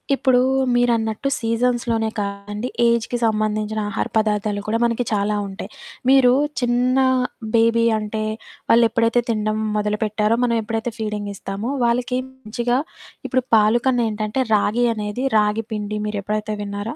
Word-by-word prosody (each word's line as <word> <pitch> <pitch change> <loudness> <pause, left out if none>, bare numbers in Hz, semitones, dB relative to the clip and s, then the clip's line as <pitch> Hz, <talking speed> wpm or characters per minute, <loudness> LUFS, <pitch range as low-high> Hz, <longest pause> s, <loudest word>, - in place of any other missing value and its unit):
ఇప్పుడూ 260 -2 +3 0.4
మీరన్నట్టు 235 0 +1
సీజన్స్‌‌లో‌నే 230 -1 0
కాదండి. 205 +3 -4 0.2
ఏజ్‌కి 235 +1 +1
సంబంధించిన 215 0 0
ఆహార 205 - -2
పదార్థాలు 210 -1 0
కూడా 225 +2 +1
మనకి 235 +1 0
చాలా 205 +1 0
ఉంటాయి. 195 - -8 0.4
మీరు 265 -2 +6 0.3
చిన్న 245 +1 +1 0.6
బేబీ 230 0 +4 0.2
అంటే 215 0 -3 0.5
వాళ్ళెప్పుడైతే 230 0 +3
తినడం 215 -1 0 0.2
మొదలుపెట్టారో, 210 +1 0
మనం 235 -1 +2
ఎప్పుడైతే 225 +2 -3
ఫీడింగిస్తామో, 205 +1 -4
వాళ్ళకి 245 +2 0
మంచిగా 245 -1 -2 0.5
ఇప్పుడు 255 -2 0
పాలు 220 +2 +4
కన్ను 245 -2 +2
ఏంటంటే, 215 +3 -3 0.2
రాగి 220 +3 +2
అనేది 210 +5 -3
రాగి 210 +1 +1
పిండి 210 0 -3
మీరు 210 -1 -3
ఎప్పుడైతే 210 +1 -2
విన్నారా? 205 +5 -5
220 Hz, 125 wpm, -21 LUFS, 210-240 Hz, 0.6 s, మీరు